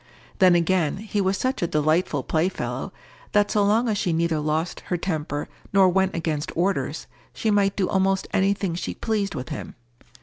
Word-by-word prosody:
Then 185 -2 +6
again, 170 -2 +1
he 210 0 -2
was 190 0 +1
such 260 +1 -1
a 175 - +1
delightful 155 -1 +1
playfellow, 165 +7 -2 0.4
that 205 0 +3
so 210 - +3
long 220 +4 +3
as 210 -3 0
she 175 - 0
neither 165 -1 +1
lost 155 +3 -1
her 180 - 0
temper, 155 -4 -3 0.3
nor 195 -2 +6
went 190 +1 +1
against 160 -3 -2
orders, 165 -5 0 0.3
she 220 - 0
might 200 -1 +2
do 190 -3 +1
almost 195 0 +1
any 195 +1 +3
thing 195 -4 -2
she 170 - -4
pleased 205 -5 -1
with 125 -3 -5
him. - - -6
185 Hz, 180 wpm, -24 LUFS, 160-200 Hz, 0.4 s, Then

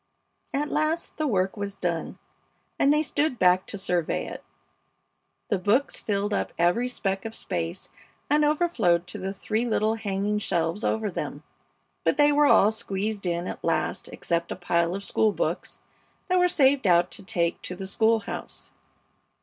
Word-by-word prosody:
At 295 +2 -1
last 310 +2 -1
the 310 - 0
work 190 -4 +1
was 200 -1 -4
done, 170 -4 -3 0.6
and 280 - +5
they 300 +1 +3
stood 290 -3 0
back 180 -1 +4
to - - -5
survey 180 -4 -1
it. - - -8 1.1
The 200 - +1
books 215 +9 +1
filled 205 0 -1
up - - -1
every 175 +9 +2
speck 195 -6 -1
of 225 0 -6
space 175 -2 -4 0.4
and 300 +1 +3
overflowed 295 - +2
to 180 - -7
the 190 +1 -3
three 215 +3 -2
little 220 -2 +1
hanging 210 -1 -1
shelves 170 0 -1
over 220 -2 0
them; - - -5 0.6
but - - +2
they 295 0 +5
were 295 0 +4
all 210 -6 +6
squeezed 205 -2 -3
in 170 0 -1
at - - -6
last - - -1
except 170 0 -2
a - - -2
pile 170 -1 0
of 200 - -5
school 215 +1 +2
books - - -3 0.5
that 365 0 +3
were 360 - +5
saved 275 - +3
out 175 0 +4
to 210 - -8
take 175 -5 -1
to 180 - -6
the 190 +1 -6
school 220 +3 +2
house. - - -7
205 Hz, 170 wpm, -26 LUFS, 180-250 Hz, 1.1 s, all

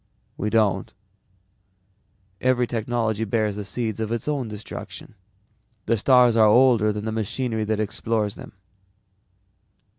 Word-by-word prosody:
We 105 - -2
don't. 110 -3 +1 1.5
Every 125 -1 +2
technology 115 -2 -1
bears 110 -1 0
the 105 - -5
seeds 110 +1 -3
of 110 0 -3
its 115 +4 -3
own 140 -5 -1
destruction. 105 0 -8 0.7
The 115 - +2
stars 125 +1 +4
are 110 -1 +6
older 115 -2 +4
than 105 0 -5
the 110 - -2
machinery 110 +1 -2
that 110 0 -1
explores 110 0 -1
them." - - -12
110 Hz, 125 wpm, -23 LUFS, 105-120 Hz, 1.5 s, are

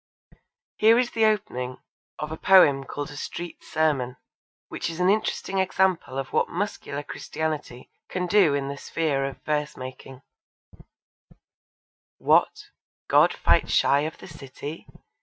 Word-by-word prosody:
Here 225 +2 +6
is 245 -1 +1
the 225 -1 +2
opening 130 -13 -1 0.4
of 150 0 -5
a - - -3
poem 155 -7 +5
called 145 +1 -6
A - - -10
Street 170 +3 -7
Sermon, 135 -6 0 0.5
which - - -4
is 165 +1 -7
an 180 +1 +4
interesting 200 -2 -1
example 185 -6 +1
of 135 -1 -4
what - - +2
muscular 170 -6 -4
Christianity 150 -4 -5 0.2
can 180 0 -2
do 180 -5 +4
in 140 -1 -2
the 140 0 -5
sphere 145 -3 -1
of 135 - -7
verse 150 0 -2
making: 130 +1 -9 1.9
What, - - +2 0.4
God - - +5
fight - - +2
shy 140 - +3
of 155 +2 -3
the - - -12
city? 145 -1 -9
155 Hz, 140 wpm, -25 LUFS, 135-185 Hz, 1.9 s, Here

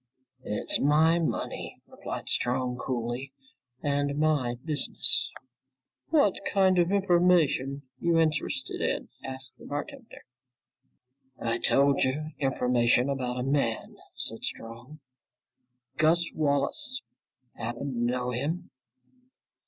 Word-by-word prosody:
"It's 105 - +1
my 155 +4 +4
money," 165 - -3
replied - - -7
Strong 125 0 0
coolly, 125 +2 -3 0.5
"and 145 0 0
my 150 -6 +1
business!" 150 -3 +3 0.8
"What 285 - +4 0.2
kind 190 -2 +4
of 175 +1 +2
information 175 -8 +2 0.2
you 170 -1 +2
interested 150 -4 -1
in," - - -1
asked 130 0 -8
the - - -13
bartender. 230 - -7 1.1
"I 115 0 0
told 140 0 +3
you, 150 +4 -1
information 125 -2 +2
about 125 -2 -2
a - - -1
man," 135 -4 -1 0.2
said - - -1
Strong. 120 +7 -7 1.0
"Gus 170 +2 +3
Wallace. 145 - 0 0.5
Happen 120 +4 -4
to 120 - -3
know 125 +1 0
him?" 150 +8 -3
140 Hz, 105 wpm, -28 LUFS, 125-160 Hz, 1.1 s, my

